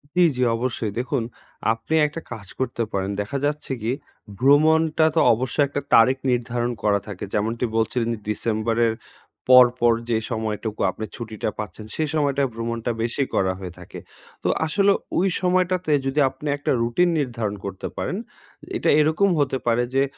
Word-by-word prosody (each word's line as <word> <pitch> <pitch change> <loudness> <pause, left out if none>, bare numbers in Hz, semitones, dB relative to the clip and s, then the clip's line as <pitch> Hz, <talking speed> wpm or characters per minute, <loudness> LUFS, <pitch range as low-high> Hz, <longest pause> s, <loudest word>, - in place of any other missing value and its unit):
জি, 180 - +4 0.2
জি, 125 - +2
অবশ্যই। 120 -3 -2
দেখুন, 125 -1 -1 0.5
আপনি 115 +7 -6
একটা 155 +2 -4
কাজ 105 -5 -7
করতে 120 -2 -1
পারেন। 95 0 -1
দেখা 105 +7 -3
যাচ্ছে 145 -1 -2
কি, 110 +3 -1 0.5
ভ্রমণটা 155 +3 +4
তো - - +4
অবশ্যই 130 +5 +1
একটা 140 +1 -3
তারিখ 125 +4 +6
নির্ধারণ 120 0 -1
করা 100 -1 +3
থাকে। 100 -3 -7
যেমনটি 115 +4 0
বলছিলেন 115 +1 0
যে 115 - -6
ডিসেম্বরের 115 +1 0 0.6
পর, 125 0 +10
পর 120 0 +4 0.2
যে 115 - +2
সময়টুকু 110 -1 -3
আপনি 110 - -6
ছুটিটা 110 -2 -4
পাচ্ছেন, 105 +1 -6
সেই 155 -2 -1
সময়টায় 140 -3 +1
ভ্রমণটা 115 +1 -3
বেশি 120 +4 0
করা 95 -1 +2
হয়ে 90 -2 -7
থাকে। 90 - -10 0.4
তো - - 0 0.2
আসলে 200 +5 +3 0.3
ওই 185 - +3
সময়টাতে 185 -2 +1
যদি 135 +2 0
আপনি 135 +3 -9
একটা 145 - -1
রুটিন 120 +10 +2
নির্ধারণ 115 -7 -2
করতে 95 -1 -5
পারেন, - - -2 0.6
এটা - - 0
এরকম 160 +6 +3
হতে 135 -2 +1
পারে 120 +1 +3
যে, 135 - +4
120 Hz, 160 wpm, -23 LUFS, 110-145 Hz, 0.6 s, পর